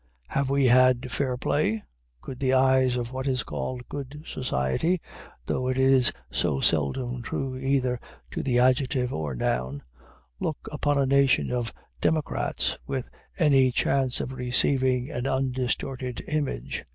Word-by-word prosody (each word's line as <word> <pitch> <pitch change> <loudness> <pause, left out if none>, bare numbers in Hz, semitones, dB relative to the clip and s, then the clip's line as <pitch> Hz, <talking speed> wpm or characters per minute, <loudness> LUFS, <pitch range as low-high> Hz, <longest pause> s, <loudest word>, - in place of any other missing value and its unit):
Have 140 -1 0
we 140 0 +3
had 130 0 +4
fair 130 -1 -1
play? 110 -5 0 0.4
Could 130 - -8
the 130 -1 +2
eyes 130 -1 +4
of 120 0 -3
what 130 +1 -4
is 130 -3 0
called 125 -1 -5
Good 145 +1 -7
Society 130 - 0 0.5
(though 130 - -1
it 130 0 0
is 130 -2 +5 0.2
so 70 - 0
seldom 120 - +1
true 130 +3 -3
either 130 -2 0 0.3
to - - -3
the 125 -2 +1
adjective 130 0 +2
or 75 -4 -3
noun) 65 +3 -2 0.6
look 155 - -3
upon 145 -1 0
a 140 - +3
nation 140 0 +3
of 120 -2 -1 0.3
democrats 155 -2 0
with 135 -2 -4 0.3
any 135 -7 +4
chance 130 0 +1
of 130 - -4
receiving 130 +1 +1
an 125 -1 -2
undistorted 130 -1 -2
image? 145 - -2
130 Hz, 140 wpm, -26 LUFS, 125-135 Hz, 0.6 s, is